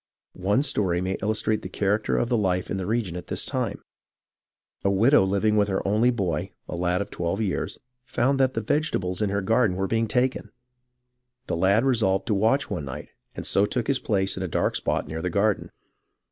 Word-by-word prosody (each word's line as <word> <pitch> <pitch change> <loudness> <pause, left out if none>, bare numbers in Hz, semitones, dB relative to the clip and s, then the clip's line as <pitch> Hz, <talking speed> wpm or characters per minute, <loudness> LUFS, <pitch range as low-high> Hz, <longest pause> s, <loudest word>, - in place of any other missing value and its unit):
One 105 +9 +2
story 100 -11 +1
may 95 +1 -2
illustrate 110 0 0
the 95 - -7
character 105 +3 0
of 120 - +1
the 120 - +1
life 95 -4 0
in - - -1
the 95 -1 -3
region 110 -6 -1
at 90 - -7
this - - -1
time. - - -3 1.0
A 100 - +3
widow 110 +7 +5
living 100 +3 +1
with 105 -1 +3
her 95 -1 -1
only 110 +5 +3
boy, 95 -10 -2
a - - -5
lad 90 +2 0
of - - -16
twelve 85 +4 -2
years, 105 -4 -2 0.3
found 130 +2 0
that 130 -1 +2
the 115 - 0
vegetables 110 - -1
in 105 - +1
her 100 0 -1
garden 110 -2 +2
were 95 - 0
being 115 +3 0
taken. 125 +3 0 1.0
The - - -2
lad 100 +8 +3
resolved 100 -7 +2
to 110 - 0
watch 115 +8 +2
one 75 - -4
night, 70 - -7 0.3
and - - -5
so 100 +1 +2
took 120 0 -1
his 135 +1 +1
place 95 -6 0
in 95 - -5
a 95 - -2
dark - - 0
spot - - -1
near 80 +1 -5
the 90 - -1
garden. 100 +3 +1
100 Hz, 205 wpm, -25 LUFS, 95-115 Hz, 1.0 s, widow